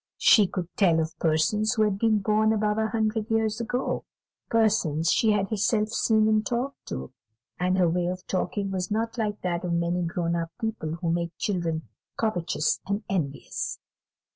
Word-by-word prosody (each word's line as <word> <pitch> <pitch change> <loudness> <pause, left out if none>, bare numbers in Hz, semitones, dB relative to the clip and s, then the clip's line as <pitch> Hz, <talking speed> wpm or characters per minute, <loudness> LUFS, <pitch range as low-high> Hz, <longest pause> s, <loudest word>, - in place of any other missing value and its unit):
She 230 - +6
could 180 -2 -4
tell 170 -5 +4
of 160 0 -2
persons 210 +8 +2
who 220 - +3
had 205 -2 0
been 225 -1 +3
born 215 +2 +3
above 210 0 +1
a 220 - +1
hundred 220 0 -1
years 225 0 +1
ago, 245 +3 -2 0.5
persons 205 -9 +2
she 225 - +3
had 200 +1 0
herself 215 0 +1
seen 220 -1 +2
and 215 0 +3
talked 255 +3 -3
to; 65 0 -6 0.5
and 180 +1 +1
her 180 -2 +4
way 175 +1 0
of 180 0 -4
talking 195 +1 -2
was 185 -1 -2
not 225 +2 -2
like 210 -1 -1
that 175 -1 -1
of 175 -1 -1
many 170 +1 0
grown 170 0 -1
up 165 -1 -2
people 220 -9 -3
who 170 -1 -2
make 170 0 -2
children 170 -5 -1 0.3
covetous 175 -8 0
and 200 +2 -1
envious. 150 -8 -3
200 Hz, 175 wpm, -26 LUFS, 170-220 Hz, 0.5 s, She